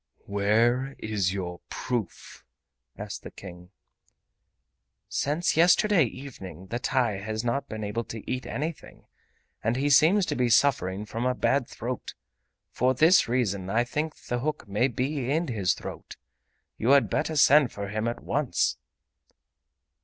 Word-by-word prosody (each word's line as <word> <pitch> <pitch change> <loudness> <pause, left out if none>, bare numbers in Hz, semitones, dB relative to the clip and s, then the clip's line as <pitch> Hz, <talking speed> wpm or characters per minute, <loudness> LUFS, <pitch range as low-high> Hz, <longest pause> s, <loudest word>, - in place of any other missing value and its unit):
"Where 115 +7 +1
is 105 -4 -1
your 90 -3 -5
proof?" 120 -7 -5 0.5
asked - - -6
the - - -9
King. 90 -2 -12 1.4
"Since 150 +5 0
yesterday 175 +1 +5
evening 100 - -9
the 120 - -1
TAI 120 -6 0
has 110 +2 -4
not 120 +4 -2
been 110 0 -5
able 105 +3 -2
to 110 -2 -8
eat 130 0 -3
anything, 155 +2 -6 0.6
and 115 +2 +1
he 140 +3 +1
seems 180 +7 +5
to - - -2
be 125 -1 +1
suffering 110 -6 +2
from 115 +4 -2
a 125 - 0
bad 130 0 +1
throat! 125 +2 -6 0.6
For 130 +2 +1
this 160 +7 +5
reason 100 -7 -1
I 115 +4 +2
think 150 +5 -3
the 125 - -2
hook 150 -2 -3
may 105 +6 +1
be 130 +1 -2
in 160 +2 0
his 100 -7 +1
throat. - - -9 0.6
You 125 +5 +4
had 140 - +1
better 155 +1 -1
send 145 -2 +5
for 100 -1 -6
him 110 +2 -2
at 120 - -4
once!" 140 -1 0
120 Hz, 145 wpm, -27 LUFS, 105-140 Hz, 1.4 s, yesterday